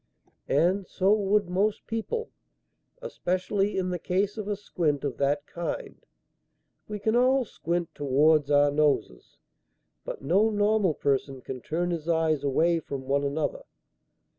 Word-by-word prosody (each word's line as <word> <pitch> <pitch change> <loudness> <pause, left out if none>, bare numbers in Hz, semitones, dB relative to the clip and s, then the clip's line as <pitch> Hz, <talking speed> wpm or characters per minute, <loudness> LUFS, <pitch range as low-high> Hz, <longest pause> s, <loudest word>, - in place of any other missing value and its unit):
"And 180 +7 +2
so 195 +2 +2
would 205 -1 +2
most 200 +4 0
people; 450 - -3 0.7
especially 195 - -1
in 185 -1 -1
the 180 - -2
case 195 +4 0
of 215 -2 -5
a 205 - -1
squint 160 -8 -1
of 140 -3 -3
that 145 +1 0
kind. 175 - -6 0.8
We 210 - -4
can 220 +2 0
all 255 +1 +3
squint 170 -4 -3
towards 145 +1 +3
our 145 0 +4
noses, 150 -1 0 0.7
but - - -7
no 190 +10 +3
normal 205 -5 +2
person 135 -1 -1
can 130 0 -7
turn 175 +6 -2
his 165 -1 -4
eyes 160 -3 +1
away 165 +5 +2
from 140 -3 -6
one 140 +1 +1
another. 145 +1 -2
175 Hz, 140 wpm, -27 LUFS, 145-205 Hz, 0.8 s, our